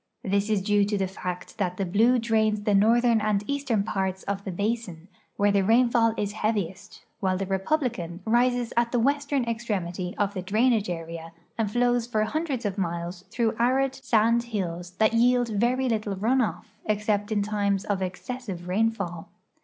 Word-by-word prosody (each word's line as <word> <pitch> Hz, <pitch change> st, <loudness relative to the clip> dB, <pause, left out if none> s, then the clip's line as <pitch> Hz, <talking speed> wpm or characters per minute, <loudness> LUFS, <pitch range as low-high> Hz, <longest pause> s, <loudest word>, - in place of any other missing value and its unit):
This 200 Hz, +2 st, 0 dB
is 205 Hz, -3 st, +1 dB
due 205 Hz, 0 st, +3 dB
to 205 Hz, 0 st, -1 dB
the 195 Hz, -, +1 dB
fact 180 Hz, +1 st, -6 dB
that 180 Hz, -2 st, -1 dB
the 195 Hz, -, -1 dB
Blue 225 Hz, +8 st, +3 dB
drains 220 Hz, -2 st, +1 dB
the 210 Hz, -, +1 dB
northern 230 Hz, +3 st, +4 dB
and 210 Hz, -1 st, +1 dB
eastern 275 Hz, -6 st, 0 dB
parts 190 Hz, -2 st, -2 dB
of 200 Hz, 0 st, -3 dB
the 195 Hz, -, -4 dB
basin, 200 Hz, -3 st, -3 dB, 0.3 s
where 205 Hz, 0 st, +3 dB
the 200 Hz, -1 st, +3 dB
rainfall 230 Hz, +1 st, +3 dB
is 205 Hz, -1 st, -1 dB
heaviest, 210 Hz, -1 st, -3 dB, 0.2 s
Avhile 185 Hz, -1 st, +1 dB
the 195 Hz, -, -2 dB
Republican 195 Hz, -, -1 dB
rises 240 Hz, +1 st, +2 dB
at 235 Hz, 0 st, +2 dB
the 245 Hz, -, +1 dB
western 280 Hz, +1 st, +1 dB
extremit}' 190 Hz, -6 st, -3 dB
of 200 Hz, -1 st, 0 dB
the 190 Hz, -, -3 dB
drainage 215 Hz, +2 st, +2 dB
area 165 Hz, -1 st, -6 dB, 0.2 s
and 220 Hz, -3 st, -1 dB
flows 245 Hz, +1 st, +1 dB
for 215 Hz, -3 st, +1 dB
hundreds 280 Hz, 0 st, -2 dB
of 200 Hz, -1 st, -2 dB
miles 175 Hz, +1 st, -3 dB
through 230 Hz, +1 st, 0 dB
arid 260 Hz, +3 st, +2 dB
sand 230 Hz, -2 st, +2 dB
hills 175 Hz, -6 st, -4 dB
that 220 Hz, +2 st, +3 dB
yield 245 Hz, +1 st, +3 dB
very 240 Hz, +5 st, +1 dB
little 215 Hz, -4 st, -1 dB
run 235 Hz, +7 st, +2 dB
off, 215 Hz, -1 st, -3 dB
except 210 Hz, 0 st, 0 dB
in 205 Hz, -2 st, +1 dB
times 200 Hz, -1 st, 0 dB
of 200 Hz, -2 st, -1 dB
ex 185 Hz, -1 st, -4 dB
cessive 235 Hz, -9 st, -5 dB
rainfall. 195 Hz, -4 st, -1 dB
210 Hz, 175 wpm, -26 LUFS, 190-235 Hz, 0.3 s, northern